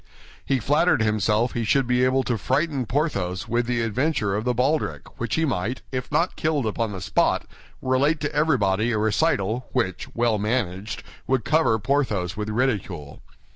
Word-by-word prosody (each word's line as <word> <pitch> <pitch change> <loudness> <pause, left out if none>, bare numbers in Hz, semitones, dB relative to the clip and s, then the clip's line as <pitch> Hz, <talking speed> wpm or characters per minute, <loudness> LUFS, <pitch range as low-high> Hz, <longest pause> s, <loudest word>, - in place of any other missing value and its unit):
He 135 - +1
flattered 145 +1 +3
himself 110 +2 +1
he 120 - -2
should 135 +4 +2
be 125 +1 +2
able 130 +1 +3
to 120 - 0
frighten 135 - 0
Porthos 100 - -1
with 120 +1 0
the 120 -1 0
adventure 115 -2 0
of 105 +3 -2
the 125 -1 +1
baldric, 140 +6 -1
which 115 -1 -1
he 160 - +2
might, 120 -1 -2
if 130 -2 -4
not 165 +5 +1
killed 155 -5 0
upon 110 0 -1
the 95 - -5
spot, 95 - +1 0.4
relate 140 +4 +2
to 145 - -2
everybody 120 -8 +2
a 110 - 0
recital 110 0 +1
which, 115 -8 -1
well 115 -2 +2
managed, 105 -2 -2 0.2
would 130 -3 +1
cover 140 -8 +3
Porthos 110 -7 0
with 105 0 -4
ridicule. 100 - -2
120 Hz, 170 wpm, -24 LUFS, 105-135 Hz, 0.4 s, flattered